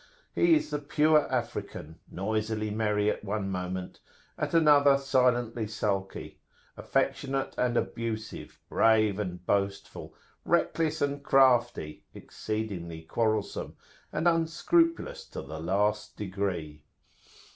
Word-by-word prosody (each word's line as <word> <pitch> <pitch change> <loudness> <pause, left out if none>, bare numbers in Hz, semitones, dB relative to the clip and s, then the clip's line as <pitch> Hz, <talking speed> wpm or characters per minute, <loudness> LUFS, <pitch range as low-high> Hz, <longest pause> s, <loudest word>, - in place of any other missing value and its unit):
He 345 -2 +5
is 310 - -1
the 150 - -1
pure 150 +1 +2
African, 115 - -4
noisily 110 +2 -2
merry 105 -1 +1
at - - -6
one 100 -1 -2
moment, 90 0 -4 0.4
at - - -3
another 145 -3 +6
silently 120 -4 +1
sulky; 100 -2 -3 0.4
affectionate 135 -1 -1
and 120 -1 +1
abusive, 110 -2 -4
brave 110 -3 +3
and 90 -3 -5
boastful, 100 0 -2 0.3
reckless 160 -2 +1
and 140 0 -1
crafty, 120 - +3
exceedingly 95 -7 -5
quarrelsome, 110 +4 -1 0.4
and 170 - 0
unscrupulous 330 - +1
to - - -7
the 80 0 -7
last 105 +5 0
degree. 90 -7 -3
110 Hz, 105 wpm, -28 LUFS, 100-140 Hz, 0.4 s, another